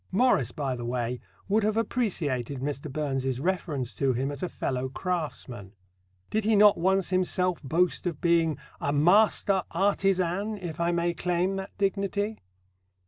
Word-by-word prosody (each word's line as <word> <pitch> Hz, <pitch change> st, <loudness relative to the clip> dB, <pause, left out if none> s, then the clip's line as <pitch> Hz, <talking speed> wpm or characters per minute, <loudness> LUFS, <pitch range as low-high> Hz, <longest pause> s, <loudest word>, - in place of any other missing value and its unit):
Morris, 190 Hz, -, +3 dB
by 135 Hz, -2 st, -2 dB
the 120 Hz, -, -6 dB
way, 120 Hz, 0 st, -2 dB, 0.3 s
would 210 Hz, +3 st, +2 dB
have 215 Hz, +1 st, +1 dB
appreciated 150 Hz, -, -1 dB
Mr. 140 Hz, +1 st, -4 dB
Burns's 135 Hz, -3 st, -2 dB
reference 150 Hz, -6 st, -2 dB
to 135 Hz, -2 st, +1 dB
him 135 Hz, +4 st, -1 dB
as 140 Hz, -, -6 dB
a 180 Hz, -, -2 dB
fellow 130 Hz, 0 st, -2 dB
craftsman: 135 Hz, -, -4 dB, 0.6 s
did 215 Hz, 0 st, 0 dB
he 220 Hz, +1 st, +3 dB
not 205 Hz, 0 st, +7 dB
once 190 Hz, +2 st, +1 dB
himself 185 Hz, -1 st, +1 dB
boast 170 Hz, +6 st, 0 dB
of 165 Hz, -5 st, -3 dB
being 165 Hz, -3 st, +2 dB, 0.2 s
"a 140 Hz, -, -1 dB
master 190 Hz, +5 st, +4 dB
artisan, 195 Hz, +2 st, +1 dB
if 175 Hz, -5 st, -6 dB
I 170 Hz, 0 st, +1 dB
may 170 Hz, 0 st, 0 dB
claim 180 Hz, +2 st, 0 dB
that 190 Hz, 0 st, -7 dB
dignity"? 200 Hz, +2 st, -1 dB
170 Hz, 150 wpm, -27 LUFS, 140-195 Hz, 0.6 s, not